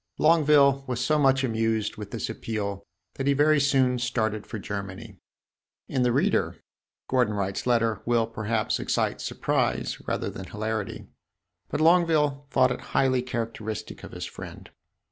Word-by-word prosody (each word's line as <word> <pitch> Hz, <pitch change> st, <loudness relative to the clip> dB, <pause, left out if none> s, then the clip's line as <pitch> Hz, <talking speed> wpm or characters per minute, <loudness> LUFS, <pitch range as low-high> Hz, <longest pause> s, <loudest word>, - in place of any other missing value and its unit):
Longueville 150 Hz, -4 st, +5 dB
was 125 Hz, -2 st, -2 dB
so 150 Hz, +5 st, +2 dB
much 135 Hz, -1 st, +3 dB
amused 110 Hz, -3 st, 0 dB
with 105 Hz, -1 st, -7 dB
this 115 Hz, -, -3 dB
appeal 100 Hz, -3 st, -4 dB, 0.3 s
that 135 Hz, -, -3 dB
he 140 Hz, -, +5 dB
very 150 Hz, +2 st, +4 dB
soon 130 Hz, -3 st, +3 dB
started 110 Hz, -3 st, -1 dB
for 115 Hz, -, -5 dB
Germany. 100 Hz, 0 st, -6 dB, 0.7 s
In 130 Hz, -, -1 dB
the 125 Hz, -1 st, +3 dB
reader, -, -, +1 dB, 0.5 s
Gordon 125 Hz, -5 st, +2 dB
Wright's 95 Hz, +3 st, -2 dB
letter 115 Hz, -3 st, +2 dB
will, 120 Hz, -1 st, +2 dB
perhaps, 110 Hz, -1 st, -1 dB
excite -, -, -1 dB
surprise -, -, -1 dB
rather -, -, -2 dB
than 95 Hz, -, -8 dB
hilarity; 110 Hz, 0 st, -4 dB, 0.6 s
but -, -, -2 dB
Longueville 155 Hz, -4 st, +3 dB
thought 130 Hz, -1 st, +3 dB
it -, -, -4 dB, 0.2 s
highly 130 Hz, -2 st, +3 dB
characteristic 115 Hz, -3 st, -5 dB
of -, -, -10 dB
his -, -, -5 dB
friend. -, -, -10 dB
120 Hz, 145 wpm, -26 LUFS, 110-135 Hz, 0.7 s, Longueville